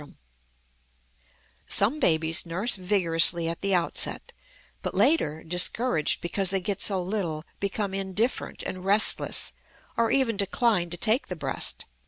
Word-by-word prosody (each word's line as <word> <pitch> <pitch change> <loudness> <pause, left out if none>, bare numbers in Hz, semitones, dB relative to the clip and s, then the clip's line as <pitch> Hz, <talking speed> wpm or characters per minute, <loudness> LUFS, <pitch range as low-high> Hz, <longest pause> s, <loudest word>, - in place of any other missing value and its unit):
Some 230 +10 +2
babies 160 - +2
nurse 185 +8 -1
vigorously 175 -3 +2
at 165 0 -4
the 195 -1 +1
outset, 175 -2 -1 0.5
but - - -4
later, 200 - +2
discouraged 180 +2 +1
because 190 +2 -2
they 195 0 0
get 195 +1 -4
so 190 -3 +1
little, 175 -6 -3 0.2
become 200 0 -3
indifferent 195 +5 -2
and 185 0 -6
restless, 205 +3 +2 0.4
or 230 -1 +1
even 255 -6 +1
decline 200 -2 +1
to 175 - -5
take 225 - +1
the 180 - -5
breast. 140 -5 -2
190 Hz, 130 wpm, -26 LUFS, 170-210 Hz, 0.5 s, Some